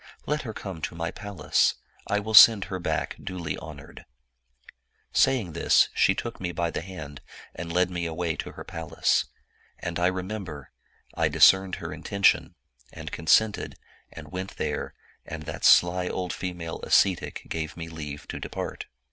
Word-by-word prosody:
Let 150 +1 -1
her 115 -4 -6
come 95 -5 -7
to 80 - -4
my 85 0 -3
palace; 100 -2 0 0.3
I 105 - +1
will 110 +2 -5
send 110 -1 +9
her 95 - -2
back 90 - -2
duly 90 -3 -4
honored.' - - -11 1.1
Saying 110 -11 +2
this, 85 - +4
she - - +3
took - - -5
me 90 -1 -2
by 85 -1 -1
the - - -3
hand, 80 -6 -9 0.3
and 85 -1 -6
led 90 +1 +2
me 85 -1 -2
away 80 0 -2
to - - -5
her - - -9
pal 80 -3 -8
ace. - - +3 0.5
And 85 0 -4
I 90 - +3
remember, 95 - -5 0.4
I - - +1
discerned 95 -1 +5
her 80 -1 -6
intention, 100 +5 +1 0.4
and - - -8
con 80 - -7
sented, 110 +3 +3 0.4
and 75 -2 -11
went 95 +1 -6
there, - - -3 0.3
and 80 -1 -7
that - - -7
sly 90 +1 +5
old 90 -1 -3
female 90 -3 -5
ascetic 95 -3 +2
gave 80 0 -4
me 85 -1 -6
leave 75 -3 -7
to - - -5
depart. - - -5
90 Hz, 165 wpm, -26 LUFS, 80-95 Hz, 1.1 s, send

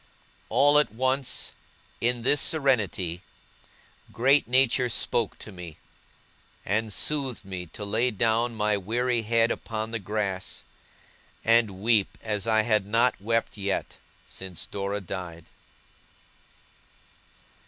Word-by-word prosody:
All 145 +1 +5
at 150 - +1
once, 130 +3 0 0.5
in 120 0 +1
this 140 +3 +3
serenity, 110 - +1 0.9
great 135 +2 +3
Nature 125 0 +3
spoke 115 -1 0
to 105 - -9
me; 90 -4 -10 0.9
and 110 +2 0
soothed 135 -2 -1
me 90 -2 -6
to 105 +6 -7
lay 110 +5 +1
down 115 +1 0
my 105 -1 +1
weary 120 +5 0
head 115 +1 +2
upon 110 0 -4
the 115 - -2
grass, 100 -2 -3 0.8
and 115 -4 +3
weep 110 -3 +2
as 105 -1 -2
I 110 -1 +3
had 105 -3 +1
not 115 +1 +2
wept 115 +1 -1
yet, 100 -1 -3 0.3
since 95 -3 -7
Dora 100 +1 -4
died! 85 -3 -7
110 Hz, 115 wpm, -26 LUFS, 100-120 Hz, 0.9 s, All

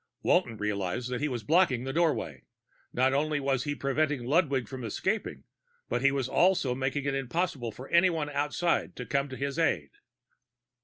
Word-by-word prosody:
Walton 115 - +2
realized 105 +4 -2
that 125 - -2
he 150 - +1
was 120 -5 -4
blocking 155 -7 +3
the 135 0 -4
doorway; 165 -4 0 0.5
not 130 +2 +2
only 150 +1 +1
was 135 -1 0
he 145 0 -2
preventing 140 -2 0
Ludwig 140 -3 +2
from 130 -2 -7
escaping, 190 - -2 0.6
he 140 +2 +4
was 135 -2 -1
also 170 -4 +3
making 135 +2 -2
it 140 - 0
impossible 135 -2 -2
for 130 +5 -10
anyone 170 -4 +3
outside 150 +4 0
to 125 - -6
come 140 +5 0
to 130 - -7
his 140 +3 -3
own 165 - +5
aid. 70 -2 -2
140 Hz, 170 wpm, -29 LUFS, 125-155 Hz, 0.6 s, own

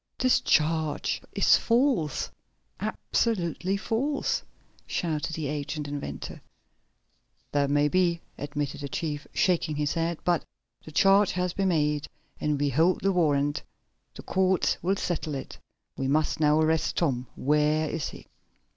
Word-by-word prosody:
"This 255 -1 +4
charge 155 -1 +1
is - - +5
false! 230 - +1 0.5
Absolutely 190 -3 -1
false!" 265 +8 -1 0.5
shouted 160 -1 -2
the 160 - -3
aged 145 +1 -3
inventor. 140 - -6 1.1
"That 140 -1 +1
may 145 +1 +3
be," 170 +1 +2 0.2
admitted 145 0 -4
the 140 - -4
chief 150 -2 -3
shaking 170 -4 +1
his 150 0 0
head. 165 0 -1
"But 175 -2 +2 0.4
the 155 - -10
charge 195 +5 +4
has 180 0 -1
been 195 -1 0
made, 150 -3 +1 0.3
and 150 -2 0
we 145 0 +2
hold 160 +7 +2
the 195 - +2
warrant. 145 -5 +1 0.5
The - - -9
courts 190 -1 +2
will 190 +3 +1
settle 160 -6 -2
it. 135 - -7 0.4
We 135 - -2
must 155 +3 +1
now 150 0 +4
arrest 160 0 +1
Tom. 130 -7 0
Where 150 +2 +2
is 155 -1 -3
he?" - - -12
155 Hz, 140 wpm, -27 LUFS, 145-180 Hz, 1.1 s, is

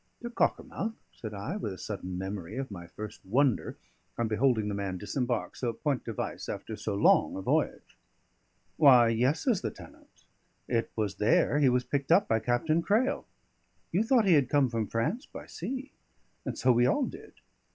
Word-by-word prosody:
"To 240 - -5
Cockermouth?" 225 -2 -1 0.2
said 110 - -7
I, 140 - -4
with 105 - -4
a - - -10
sudden 95 -3 -5
memory 95 +1 -5
of 135 -4 -4
my 85 -3 -8
first 105 +4 -9
wonder 125 +4 +1 0.4
on 115 - 0
beholding 110 0 +2
the 105 - -2
man 100 -2 -3
disembark 120 +3 -2
so 120 -2 -2
point 140 +2 -2
de 115 - -3
vice - - -5
after - - -5
so 105 - -3
long 100 - +4
a 95 - -4
voyage. - - -1 0.8
"Why, 125 -6 +7
yes," 125 +7 +1
says 240 -8 +1
the 110 - -1
tenant, - - -16 0.4
"it 115 -2 0
was 105 -4 -2
there 110 +7 +3
he 140 -3 +5
was 125 0 +2
picked 140 +2 -2
up 190 +4 +5
by 115 - +2
Captain 140 +8 +1
Crail. 250 +10 +1 0.6
You 180 - +2
thought 230 -1 +3
he 185 - +5
had 140 -5 +4
come 145 -3 +3
from 115 -3 -2
France 160 - -2
by - - -9
sea? 270 +1 -6 0.5
And - - -4
so 130 - +4
we 120 +1 +4
all 265 - +2
did." - - -10
125 Hz, 185 wpm, -29 LUFS, 105-155 Hz, 0.8 s, Why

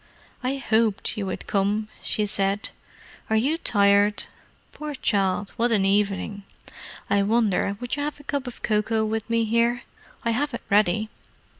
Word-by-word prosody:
"I 260 +2 -1
hoped 225 -6 +1
you 205 -3 -3
would 185 - -4
come," 205 +2 0
she 210 - 0
said. 200 +1 -1 0.6
"Are 220 - +2
you 265 +8 +2
tired? 205 -7 +3 0.5
Poor 300 -1 -6
child, 200 -4 0
what 235 +1 +2
an 200 -4 +3
evening! 200 0 0 0.7
I 200 0 +3
wonder 200 -2 +1
would 245 -1 -3
you 290 - -3
have 295 0 -3
a - - -13
cup 280 -2 -3
of 245 - -9
cocoa 220 +1 +1
with 220 +1 -3
me 230 0 +2
here? 235 +2 +1 0.4
I 230 - +2
have 275 +3 -1
it - - -7
ready." 210 +1 +3
220 Hz, 160 wpm, -25 LUFS, 200-240 Hz, 0.7 s, tired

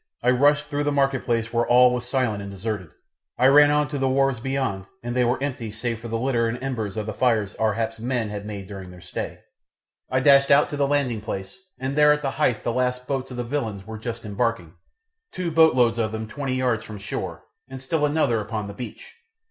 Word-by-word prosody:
I 125 - +4
rushed 145 +3 +3
through 145 0 -2
the 145 - +1
marketplace 130 -5 0
where 120 0 +1
all 125 0 +6
was 125 0 -2
silent 125 -7 0
and 100 - -7
deserted; 100 -2 -4 0.5
I 125 - +3
ran 145 +2 +7
on 150 0 +2
to 145 -2 -3
the 135 0 +1
wharves 135 -2 +2
beyond 130 -7 -2 0.2
and 120 0 -4
they 125 - +3
were 120 +1 +1
empty 130 -6 -3
save 115 +1 -3
for 120 - -8
the 115 0 -2
litter 120 -1 +1
and 115 +2 -2
embers 115 -6 -3
of 110 - -2
the 110 - -4
fires 110 -4 +1
Ar 110 -1 +2
hap's 115 0 -3
men 120 -2 -1
had 105 -1 -5
made 100 -2 -6
during 95 -2 -9
their 90 0 -12
stay; 90 0 -6 0.7
I 130 - +2
dashed 140 +1 +5
out 140 +1 +5
to - - -2
the 140 -1 +1
landing 135 -6 0
place, 95 -3 -5 0.2
and 135 +1 -3
there 150 0 +6
at 150 0 +1
the 135 - 0
hythe 130 -7 0
the 120 - -1
last 125 0 -1
boat 140 - -1
loads 130 0 -8
of 125 - -7
the 120 - -1
villains 115 -7 -3
were 110 0 -7
just 115 0 -5
embarking, 105 -5 -2 0.6
two 180 -2 -3
boatloads 130 -8 +4
of 110 -1 0
them 110 0 -4
twenty 130 +3 -3
yards 125 -4 0
from 105 -2 -8
shore, 100 +1 -5 0.3
and 130 0 -7
another 150 -5 +2
still - - -1
upon 105 0 -4
the 100 - -7
beach. 120 - -9
120 Hz, 230 wpm, -24 LUFS, 110-135 Hz, 0.7 s, ran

